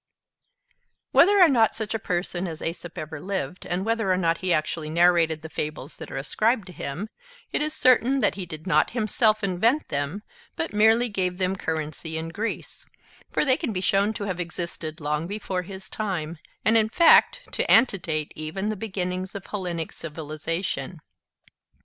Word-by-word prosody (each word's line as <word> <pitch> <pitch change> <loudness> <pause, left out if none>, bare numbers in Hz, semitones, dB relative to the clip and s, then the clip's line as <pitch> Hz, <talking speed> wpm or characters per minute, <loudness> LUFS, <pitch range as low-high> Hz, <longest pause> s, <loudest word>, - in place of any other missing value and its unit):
Whether 400 +4 +6
or 360 - +9
not 235 -7 +3
such 220 -1 -4
a 225 - -1
person 180 -1 -2
as 160 -2 -7
Aesop 170 +1 -5
ever 155 -1 -6
lived, 190 0 -4
and 180 +2 -1
whether 225 -3 +1
or 185 - +3
not 165 -2 +1
he 185 -1 -1
actually 155 0 0
narrated 170 -1 +3
the - - -5
fables 150 -2 -5
that - - -8
are - - -5
ascribed 215 - +1
to 180 - -11
him, 175 +9 -5 0.4
it - - 0
is 305 0 -1
certain 255 +1 +4
that - - +2
he 185 -3 -6
did 155 -1 -8
not 185 - +3
himself 215 -1 +2
invent 220 +10 +1
them, 145 +8 -2 0.3
but 160 - -3
merely 220 +3 +5
gave 185 -4 -1
them 185 0 0
currency 160 -2 -3
in 160 +1 -4
Greece; 215 +7 -4 0.5
for - - +1
they 260 -2 +4
can - - -2
be 185 - -2
shown 195 +2 +2
to 205 - -4
have 185 -3 -3
existed 170 -2 -4
long 150 +2 -1
before 195 -2 -3
his 190 +1 -9
time, 175 -7 -3 0.3
and 225 - +4
in 220 -1 +4
fact 335 +7 +6
to - - -2
antedate 165 - +3
even 160 +7 -3
the 215 - -1
beginnings 185 -2 -3
of 200 - -6
Hellenic 175 -5 -4
civilization. 165 +3 -4
185 Hz, 175 wpm, -25 LUFS, 160-215 Hz, 0.5 s, or